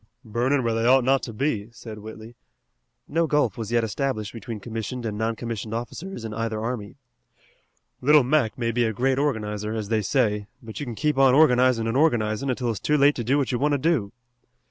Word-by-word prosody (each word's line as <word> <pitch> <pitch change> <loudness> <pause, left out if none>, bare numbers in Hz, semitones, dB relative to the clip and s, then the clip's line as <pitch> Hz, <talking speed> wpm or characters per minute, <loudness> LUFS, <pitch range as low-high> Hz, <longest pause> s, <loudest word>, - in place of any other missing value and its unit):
"Burnin' 125 +5 0
where 115 -1 0
they 115 +1 +1
ought 130 0 +5
not 135 +2 +3
to 115 - -6
be," 110 -3 -2
said 110 -2 -10
Whitley 110 +2 -10 0.7
no 165 +2 +1
gulf 150 -1 +1
was 115 -3 -5
yet 120 -1 +2
established 110 -1 -2
between 115 -1 -6
commissioned 115 +3 -5
and 105 -2 -3
non 110 +2 -1
commissioned 115 -1 -5
officers 120 +5 -6
in 110 - -5
either 115 0 -2
army. 110 -3 -4 1.1
"Little 150 +2 +6
Mac 130 -3 +1
may 115 -2 -1
be 120 +1 +1
a 110 - -1
great 130 +4 +1
organizer, 105 -6 -2
as 105 -2 -4
they 110 -1 +1
say, 105 -2 0
but 115 -5 -9
you 145 - -5
can 120 - -5
keep 150 +2 0
on 135 -1 +6
organizin' 125 -5 +4
an' 115 - -1
organizin', 120 -4 +1
until 125 -2 -1
it's 110 - -5
too 150 - +1
late 145 +1 +5
to 120 - -4
do 130 +5 +2
what 140 -2 0
you 120 - -1
want 145 +2 +2
to - - +3
do." 135 -9 0
120 Hz, 210 wpm, -24 LUFS, 110-135 Hz, 1.1 s, Little